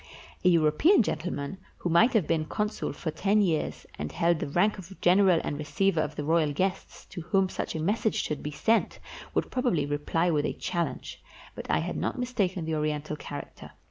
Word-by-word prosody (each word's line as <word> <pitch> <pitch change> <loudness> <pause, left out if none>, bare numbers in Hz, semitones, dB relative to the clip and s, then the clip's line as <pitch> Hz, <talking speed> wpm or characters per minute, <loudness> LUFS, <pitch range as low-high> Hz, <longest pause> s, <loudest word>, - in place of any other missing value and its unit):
A 180 - +6
European 170 - +4
gentleman, 155 0 -3 0.2
who - - -4
might 220 +10 +5
have 215 -8 +3
been 160 -1 0
consul 210 +6 -2
for 160 - -4
ten 200 +6 +2
years, 170 -7 0
and 75 0 -4
held 170 -1 +1
the - - -3
rank 190 +8 +1
of 190 +1 -11
general 185 -1 +5
and 145 - -3
receiver 165 +3 +1
of - - -3
the 150 - -3
royal 160 0 +2
guests, 185 +5 -3
to 175 - -8
whom 190 +3 +1
such - - -4
a - - -2
message 210 +7 0
should 150 - -2
be 150 - -4
sent, 220 +10 +1 0.4
would - - 0
probably 245 - +1
reply 150 +4 0
with 150 -2 +1
a - - -2
challenge; 175 -2 -4 0.3
but - - -8
I - - +3
had - - -4
not - - -2
mistaken 200 -9 -1
the 160 - -2
Oriental 150 0 -2
character. 145 -1 -9
170 Hz, 195 wpm, -28 LUFS, 155-195 Hz, 0.4 s, A